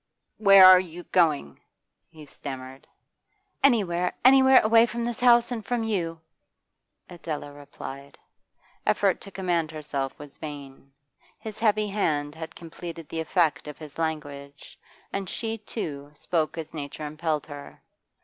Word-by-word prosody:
'Where 195 -3 +8
are 185 0 +10
you 175 -1 -7
going?' 155 - +1 0.5
he 155 -1 -13
stammered. 135 -2 -9 0.8
'Anywhere, 185 -9 +2
anywhere, 265 0 +7
away 225 +2 +5
from 235 0 -4
this 240 -1 -3
house 240 -1 +5
and 230 -3 -4
from 240 +1 -2
you!' 170 -7 -2 0.9
Adela 155 -4 -6
replied. 140 -1 -10 0.7
Effort - - +1
to - - -10
command 175 -5 -1
herself 145 -3 -4
was 145 -1 -12
vain; 140 -3 -9 0.5
his 220 -1 -8
heavy 215 -2 +2
hand 150 -8 -1
had 160 0 -8
completed 165 -1 -9
the 165 - -4
effect 160 -3 0
of 150 -1 -8
his 155 0 -11
language, 145 -3 -5 0.3
and 195 -2 -3
she, 225 -1 -4
too, 145 -9 -6
spoke 160 +1 -1
as 160 -1 -6
nature 145 0 -6
impelled 155 0 -2
her. 145 -2 -11
165 Hz, 135 wpm, -26 LUFS, 145-200 Hz, 0.9 s, are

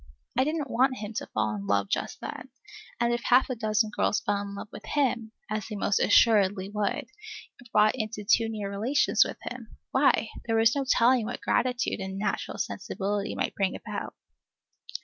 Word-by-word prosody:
I 260 - +4
didn't 300 -1 -2
want 255 +2 +2
him 210 +1 -6
to - - -3
fall 110 0 -1
in 100 -1 -6
love 100 0 +2
just - - -3
then 265 - -7 0.5
and 235 0 +2
if 240 - -1
half 255 +2 +4
a - - -1
dozen 215 -1 +1
girls 205 - +2
fell 200 0 -1
in 200 0 -6
love 200 - -7
with - - -10
him, 245 -6 0 0.2
as 215 -1 -3
they 215 - -6
most 200 0 +1
assuredly 200 -3 +4
would, 210 +7 -1 0.5
if 245 -2 -17
brought 215 0 +5
into 215 -3 -4
too 225 +2 +3
near 210 -2 -4
relations 230 +9 +3
with - - -6
him, 240 -3 -8
why, 265 -4 +3 0.2
there 225 - +1
was 225 +2 +4
no 275 -1 0
telling 240 -2 +4
what 245 - -4
gratitude 245 -2 0
and 190 0 -5
natural 210 +2 -2
sensibility 200 +1 -3
might - - -1
bring 195 -2 0
about. - - -6
220 Hz, 190 wpm, -27 LUFS, 200-245 Hz, 0.5 s, brought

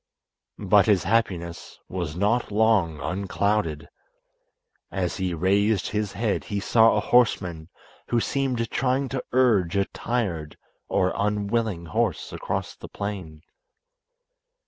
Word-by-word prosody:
But 100 -1 +4
his 100 -4 +3
happiness 90 -5 -1
was 85 -4 -4
not 105 +6 +1
long 100 -7 +2
unclouded. 95 -4 -1 1.0
As 90 -3 -2
he 95 -3 -1
raised 100 +4 +2
his 105 -2 -2
head 105 +1 -1
he 105 -2 -2
saw 115 +2 +4
a - - +3
horseman 90 -9 +1 0.4
who 120 - +2
seemed 125 -3 -1
trying 135 +1 0
to 130 0 -3
urge 110 -9 +3
a 100 - +2
tired 95 -14 -3 0.3
or 95 0 +1
unwilling 105 -2 -1
horse 110 +1 -1
across - - -3
the - - -11
plain. 95 -7 -6
100 Hz, 120 wpm, -25 LUFS, 90-115 Hz, 1.0 s, But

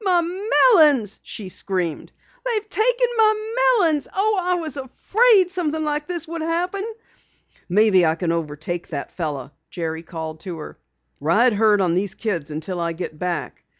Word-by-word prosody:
"My 360 -3 +3
melons!" 335 - +3
she 200 -4 -7
screamed. 180 -4 -3 0.3
"They've 440 -4 -1
taken - - +2
my 435 0 +2 0.2
melons! 320 -7 +2
Oh, 410 +1 +1
I 360 0 +1
was 320 -5 -4
afraid 380 - +3
something 315 -4 -1
like 295 0 -2
this 345 -2 -2
would 335 0 -5
happen!" 350 +4 -1 0.9
"Maybe 195 -1 +4
I 160 -1 +3
can 170 -1 -1
overtake 165 +1 -3
that 140 -3 -5
fellow," 145 -5 -4 0.2
Jerry 160 -2 -4
called 160 -2 -7
to 175 -2 -6
her. 150 - -9 0.4
"Ride 215 - +3
herd 210 -1 +3
on 175 -3 +2
these 190 +1 -1
kids 175 -10 -3
until 160 +4 -5
I 170 0 -1
get 160 -2 -7
back!" 180 -2 -4
225 Hz, 155 wpm, -22 LUFS, -, 0.9 s, Maybe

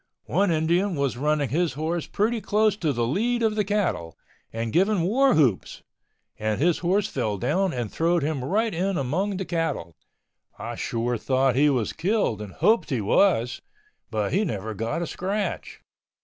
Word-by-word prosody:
One 195 +4 +1
Indian 170 +4 +1
was 140 -3 -1
running 145 +1 0
his 165 +6 0
horse 160 +3 -2
pretty 225 +2 0
close 210 0 +2
to 165 -7 -1
the 120 -3 0
lead 230 - 0
of 220 -1 +2
the 210 0 +1
cattle 195 - -1 0.3
and 115 0 -4
giving 195 +2 +3
war 255 +8 +3
whoops, 125 -11 +1 0.6
and 110 0 -1
his 170 +3 +2
horse 190 +4 +1
fell 110 - -2
down 190 - 0
and 120 -6 -4
throwed 170 -1 +1
him 145 -3 -2
right 215 - 0
in 185 +2 -1
among 185 +10 -1
the 190 - -3
cattle. 165 - -2 0.6
I - - -5
sure 120 0 -2
thought 130 0 +1
he 145 +3 +4
was 125 -6 0
killed 175 - 0
and 105 -2 -8
hoped 225 -2 +2
he 130 -5 0
was, 120 - +2 0.5
but 105 -3 -2
he 200 +5 +2
never 110 - -3
got 115 - -2
a - - -2
scratch. 195 +5 -3
165 Hz, 175 wpm, -25 LUFS, 125-200 Hz, 0.6 s, he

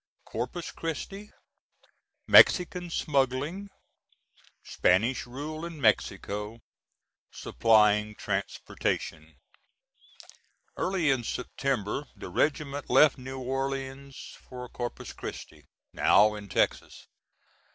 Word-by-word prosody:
CORPUS 125 +9 -5
CHRISTI 195 +6 -6 0.9
MEXICAN 180 -1 +6
SMUGGLING 145 +6 -1 0.9
SPANISH 115 +9 +1
RULE 150 +6 -6
IN 170 -2 -7
MEXICO 105 -1 0 0.7
SUPPLYING 105 - +2
TRANSPORTATION. 85 -5 -3 1.4
Early 185 -6 +1
in 130 -3 0
September 125 +1 -2
the - - -8
regiment 145 -1 -1
left 150 -3 +5
New 130 +1 -7
Orleans 135 +1 -4 0.3
for 125 -1 -7
Corpus 120 -1 -6
Christi, - - -9 0.3
now 105 +1 +5
in 105 -1 -9
Texas. - - -1
130 Hz, 80 wpm, -28 LUFS, 110-150 Hz, 1.4 s, MEXICAN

